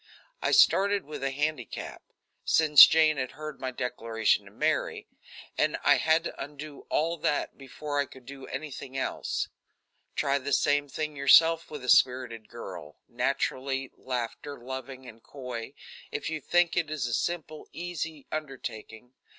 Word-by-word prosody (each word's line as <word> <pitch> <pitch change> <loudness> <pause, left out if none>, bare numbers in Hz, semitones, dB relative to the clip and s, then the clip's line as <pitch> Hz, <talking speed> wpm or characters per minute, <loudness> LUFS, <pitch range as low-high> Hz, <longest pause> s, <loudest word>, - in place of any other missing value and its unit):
I - - +1
started 200 -1 +4
with 150 -2 -7
a 135 - +1
handicap, 145 -3 -3 0.4
since 150 -3 +8
Jane 155 -1 +4
had 130 -2 -3
heard 155 -1 -8
my 130 - -3
declaration 115 -3 0
to - - -14
Mary, - - -1 0.5
and - - +2
I - - +5
had 160 +1 +3
to - - -5
undo 145 +1 -10
all 165 +2 0
that 150 - -1
before 145 +2 -5
I 140 - +1
could 130 -1 -15
do 135 0 -10
anything 135 -1 -6
else. - - -2 0.7
Try 140 0 +1
the 140 +1 -3
same 145 +1 +2
thing 155 +2 -4
yourself 160 +4 +5
with 150 -4 -7
a - - -7
spirited 125 -4 +3
girl, 90 -10 -9
naturally 135 0 -2
laughter 130 +3 -5
loving 130 +1 -7
and 115 -1 -12
coy, 125 -4 -7 0.4
if - - -3
you 160 -1 -3
think 175 +4 +2
it 165 -3 0
a 155 - -3
simple, 155 +5 -3
easy 160 -4 -5
undertaking. 125 -5 -6
140 Hz, 150 wpm, -28 LUFS, 125-155 Hz, 0.7 s, since